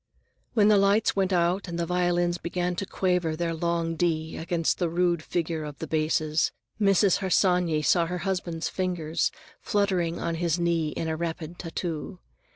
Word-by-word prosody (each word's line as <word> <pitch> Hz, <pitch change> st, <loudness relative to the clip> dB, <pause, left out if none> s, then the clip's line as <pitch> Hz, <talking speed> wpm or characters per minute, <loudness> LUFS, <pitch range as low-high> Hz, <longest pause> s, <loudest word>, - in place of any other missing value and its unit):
When 210 Hz, -3 st, +5 dB
the 210 Hz, -1 st, +6 dB
lights 200 Hz, +2 st, +3 dB
went 195 Hz, -1 st, +1 dB
out 180 Hz, +2 st, +1 dB
and 170 Hz, -1 st, -4 dB
the 170 Hz, -, 0 dB
violins 175 Hz, 0 st, +1 dB
began 175 Hz, +1 st, -2 dB
to 195 Hz, -, -3 dB
quaver 180 Hz, -4 st, 0 dB
their 165 Hz, 0 st, -1 dB
long 165 Hz, 0 st, -1 dB
D 160 Hz, -2 st, -1 dB
against 165 Hz, -1 st, -1 dB
the 175 Hz, -2 st, +1 dB
rude 175 Hz, -1 st, +1 dB
figure 165 Hz, -1 st, -2 dB
of 150 Hz, -2 st, -7 dB
the -, -, -5 dB
basses, 155 Hz, 0 st, +1 dB, 0.3 s
Mrs. 195 Hz, -1 st, +4 dB
Harsanyi 180 Hz, -4 st, +2 dB
saw 170 Hz, +1 st, +3 dB
her 180 Hz, +1 st, -3 dB
husband's 175 Hz, -4 st, -2 dB
fingers 175 Hz, -4 st, -1 dB, 0.3 s
fluttering 185 Hz, -5 st, 0 dB
on 170 Hz, -, -2 dB
his 170 Hz, -1 st, +1 dB
knee 170 Hz, -2 st, +1 dB
in 160 Hz, -, -4 dB
a 160 Hz, -, -1 dB
rapid 165 Hz, 0 st, -5 dB
tattoo. 165 Hz, +1 st, -4 dB
170 Hz, 165 wpm, -27 LUFS, 165-180 Hz, 0.3 s, the